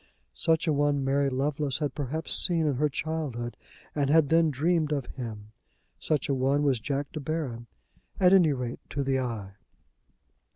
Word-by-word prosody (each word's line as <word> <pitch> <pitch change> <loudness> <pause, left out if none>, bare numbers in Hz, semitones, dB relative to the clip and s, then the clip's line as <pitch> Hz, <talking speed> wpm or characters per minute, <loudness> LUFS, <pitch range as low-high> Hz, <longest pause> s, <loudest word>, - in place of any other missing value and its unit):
Such 165 0 +1
a 160 - +2
one 145 -1 +1
Mary 140 +1 +2
Lovelace 140 +1 0
had 145 -4 -2
perhaps 150 +3 -2
seen 165 -3 +2
in 145 -4 0
her 150 +2 +2
childhood 140 -6 -3 0.4
and 140 -2 0
had 155 -1 +4
then 165 0 +4
dreamed 155 +2 +1
of 140 -4 -1
him. 110 -4 -8 0.5
Such 145 - 0
a 140 - +1
one 135 +2 +1
was 135 -4 +2
Jack 140 +4 -3
De 155 - -5
Baron, 140 -6 -4 0.5
at 185 0 +5
any 175 -5 +6
rate 125 -3 -3
to 140 - -2
the 135 -1 +1
eye. 115 -6 -4
140 Hz, 170 wpm, -28 LUFS, 130-155 Hz, 0.5 s, any